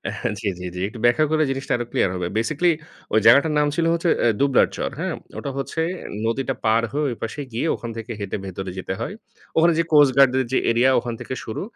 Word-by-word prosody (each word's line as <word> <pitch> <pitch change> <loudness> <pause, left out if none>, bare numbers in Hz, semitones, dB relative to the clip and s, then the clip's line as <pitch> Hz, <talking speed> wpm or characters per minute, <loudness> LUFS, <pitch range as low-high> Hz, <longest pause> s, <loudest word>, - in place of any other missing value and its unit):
হ্যাঁ, - - -2
জি, - - -3
জি, 90 - -6
জি। 90 - -5
একটু 115 - -10
ব্যাখ্যা 120 +6 +4
করলে 155 0 +2
জিনিসটা 135 0 -2
আরো 120 0 -2
ক্লিয়ার 95 - +2
হবে। 90 -1 -2
বেসিক্যালি 155 +10 +2 0.4
ওই 110 - +5
জায়গাটার 150 +2 +6
নাম 150 - +3
ছিল 165 - +1
হচ্ছে 170 0 0
অ্যা 120 - +4
দুবলার 140 -2 +4
চর, - - -2
হ্যাঁ? - - -2 0.3
ওটা - - -4
হচ্ছে 150 +4 -3 0.4
নদীটা 135 +4 -1
পার 110 +1 +3
হয়ে 150 +2 -1
ওইপাশে 115 +3 -6
গিয়ে 125 +8 -1
ওখান 120 - -7
থেকে 115 +1 -6
হেঁটে 100 0 -3
ভেতরে 95 0 -5
যেতে 95 - -4
হয়। - - -4 0.4
ওখানে 170 +1 +5
যে, - - +4
কোস্ট 145 -3 +6
গার্ডদের 130 -1 +5
যে, - - +2
এরিয়া 120 +3 +4
ওখান 120 -1 -5
থেকে - - -6
শুরু। 110 - -5
130 Hz, 220 wpm, -22 LUFS, 115-150 Hz, 0.4 s, জায়গাটার